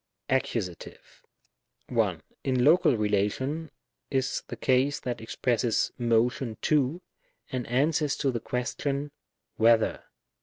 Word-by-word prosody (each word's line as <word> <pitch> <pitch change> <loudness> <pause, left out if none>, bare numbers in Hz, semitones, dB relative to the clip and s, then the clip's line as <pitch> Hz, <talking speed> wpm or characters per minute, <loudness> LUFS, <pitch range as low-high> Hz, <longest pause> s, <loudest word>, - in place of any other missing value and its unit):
Accusative, 110 -9 -3 0.7
1. - - 0 0.2
In 130 -2 +1
Local 150 -5 +5
relation, 105 +10 0 0.4
is 135 -1 0
the - - -6
case 135 +2 +2
that 125 -2 -4
expresses 120 0 0
tno 120 0 +3
tion 120 -4 -5
to^ 150 +3 +2 0.5
and 130 -3 -3
answers 145 +4 +1
to 140 -2 0
the 120 - -2
question 140 +5 -2 0.5
whether? 115 0 +3
130 Hz, 110 wpm, -28 LUFS, 115-140 Hz, 0.7 s, Local